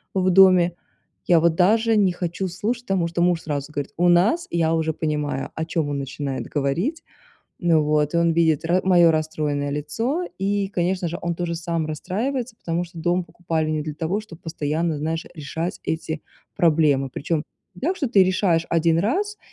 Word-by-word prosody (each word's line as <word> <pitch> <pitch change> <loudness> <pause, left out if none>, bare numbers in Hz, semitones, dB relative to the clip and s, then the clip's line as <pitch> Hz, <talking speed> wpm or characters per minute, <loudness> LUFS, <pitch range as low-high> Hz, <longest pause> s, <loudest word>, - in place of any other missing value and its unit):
в 185 -1 +2
доме, 180 -2 +6 0.5
я 170 -2 +6
вот 170 0 +3
даже 220 +5 +3
не 195 -3 +3
хочу 175 +2 -3
слушать, 220 +7 -3
потому 185 -3 +1
что 170 +1 -2
муж 175 -1 +2
сразу 145 -1 -4
говорит: 145 -2 -4
"У 175 +1 +3
нас"- 195 - +3
я 165 -1 +1
уже 160 -1 0
понимаю, 150 -3 -2
о 160 - -2
чём 160 -3 -1
он 145 -1 -2
начинает 135 0 -4
говорить. 170 - -1 0.6
Вот, 150 -3 +2
и - - +3
он 170 0 +3
видит 160 -2 +2
ра 175 +2 +2
мое 175 -3 +6
расстроенное 150 -2 -1
лицо, 225 - -2
и, 200 0 0
конечно 180 -1 -1
же, 170 - -5
он 170 0 -1
тоже 175 -1 -2
сам 165 -1 -2
расстраивается, 225 - -3
потому 170 -2 -2
что 170 0 -12
дом 175 +2 +1
покупали 165 -2 -2
не 155 -1 -1
для 150 0 -5
того, 165 +7 -2
чтоб 200 -7 -13
постоянно, 160 0 -2
знаешь, 160 +2 -3
решать 160 +3 -4
эти 160 -1 -3 0.3
проблемы. 150 -5 +3
Причем 155 +3 -2 0.3
не 180 - -14
так, 355 +7 0
что 290 -8 -1
ты 200 -4 +5
решаешь 185 -3 +1
1 165 0 +3
раз 405 - -1
170 Hz, 180 wpm, -23 LUFS, 155-185 Hz, 0.6 s, доме